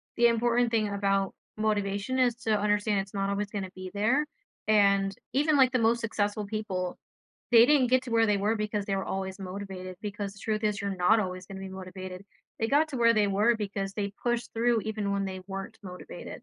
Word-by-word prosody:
the 235 0 +5
important 235 +1 +2
thing 215 -2 +1
about 195 -1 0 0.2
motivation, 210 +2 0
is 250 -2 +3
to 220 -1 +3
understand 210 0 +1
it's 195 0 -11
not 195 -1 -1
always 200 +1 -1
gonna 195 -2 -4
be 185 0 -7
there, 235 +9 +2 0.4
and 200 -2 +4 0.2
even 295 +2 +3
like 260 -2 +5
the 255 - +4
most 230 +1 +3
successful 210 -1 -1
people, 195 -4 -3 0.5
they 235 0 +8
didn't 285 -4 +5
get 255 +1 +3
to 250 - -7
where 225 0 +4
they 205 -1 +3
were 210 +3 +1
because 210 -1 -2
they 195 - -1
were 195 - -2
always 190 0 -3
motivated, 185 -1 -6
because 205 -1 -4
the 200 - -15
truth 215 0 -2
is 210 -1 0
you're 200 -1 -2
not 185 +5 +4
always 185 -2 -3
gonna 195 -1 -8
be 195 - -6
motivated. 185 0 -8 0.3
They 225 - +1
got 295 +5 +3
to 275 - -4
where 230 -1 +5
they 210 -2 +3
were 210 +4 +3
because 195 -2 -3
they 200 -2 -2
pushed 240 -1 -1
through 230 -1 +2
even 215 -2 -2
when 200 0 0
they 190 -1 -5
weren't 195 +3 -6
motivated. 180 -1 -9
205 Hz, 210 wpm, -28 LUFS, 195-230 Hz, 0.5 s, they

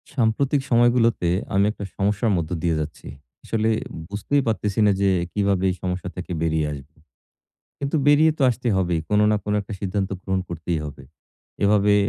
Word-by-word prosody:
সাম্প্রতিক 135 +4 +1
সময়গুলোতে 120 -6 +3 0.2
আমি 100 +1 +4
একটা 105 - -8
সমস্যার 105 +3 +1
মধ্য 80 -2 -2
দিয়ে 85 -2 +2
যাচ্ছি। 75 0 -6 0.4
আসলে 110 0 0 0.4
বুঝতেই 105 +8 0
পারতেছিনা 105 -1 +2
যে 100 - +4 0.2
কিভাবে 100 -2 +1
এই 90 - -1
সমস্যা 90 -1 -3
থেকে 90 0 -7
বেরিয়ে 80 -1 +1
আসবো? 70 +1 -11 0.8
কিন্তু 140 +2 -1
বেরিয়ে 150 +2 +5
তো - - 0
আসতে 125 +1 -3
হবেই। 90 -3 +1
কোন 105 0 +3
না 105 - +3
কোন 105 - -2
একটা 105 +2 -8
সিদ্ধান্ত 95 0 -2
গ্রহণ 95 -1 -1
করতেই 85 0 -3
হবে। 70 -2 -8 0.6
এভাবে 105 0 +4
100 Hz, 160 wpm, -23 LUFS, 90-115 Hz, 0.8 s, বেরিয়ে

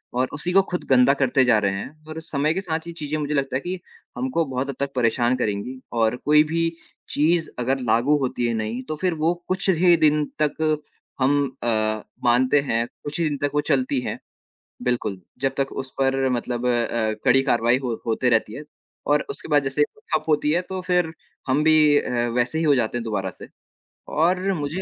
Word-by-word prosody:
और 130 +1 +1
उसी 150 +5 -2
को 195 - +7
खुद 180 - -2
गंदा 130 +1 +6
करते 135 -1 +2
जा 120 -3 +5
रहे 100 -1 +1
हैं 150 +10 -8
और 155 - -5
समय 155 0 0
के 190 - -2
साथ 165 -2 -3
ये 170 - -6
चीज़ें 155 -2 -4
मुझे 150 0 -2
लगता 135 -2 -1
है 130 - +2
कि 180 +3 -4 0.4
हमको 130 +6 0
बहुत 130 +1 -3
हद 140 - -4
तक 140 0 -2
परेशान 120 +1 +2
करेंगी 110 +3 -3 0.2
और 110 +2 +2
कोई 150 +1 +6
भी 165 0 +1 0.4
चीज़ 160 +3 +1
अगर 130 +2 0
लागू 120 +7 +3
होती 125 -2 -1
है 115 - 0
नई 110 +3 -3
तो 155 - -3
फिर 185 -2 +1
वो 160 +2 +1
कुछ 190 +1 -1
ही 175 -1 +5
दिन 150 0 +3 0.2
तक 155 +1 +1 0.4
हम 135 +2 +3 0.3
अ, 120 - -1 0.6
मानते 130 +4 +4
हैं, 115 -4 0 0.2
कुछ 145 +3 -5
ही 165 - +2
दिन 145 - -3
तक 145 -1 0
वो 150 - +3
चलती 135 -2 +1
हैं। - - -4 0.7
बिल्कुल, 120 -6 -1 0.2
जब 135 -1 0
तक 135 0 0
उस 135 -1 -5
पर 135 0 +2
मतलब 120 0 -2
अ, 115 -2 0
कड़ी 135 0 +5
कारवाई 120 -1 +2
हो 120 -3 -3
होते 120 +2 +1
रहती 110 -2 +1
है 145 - -7 0.4
और 145 0 +2
उसके - - -7
बाद 145 -2 +4
जैसे 135 +2 +1 0.3
ठप - - +1
होती 150 -1 +2
है 175 +3 +1
तो 190 - -3
फिर 180 -3 +1 0.4
हम 140 +4 +2
भी 155 -2 +5
अ, - - -3 0.3
वैसे 125 +6 +1
ही 165 - 0
हो 150 -2 +5
जाते 120 -1 0
हैं - - -4
दोबारा 95 -4 -2
से - - -12 0.7
और 185 +4 +2
मुझे 155 +2 -3
140 Hz, 210 wpm, -23 LUFS, 125-155 Hz, 0.7 s, को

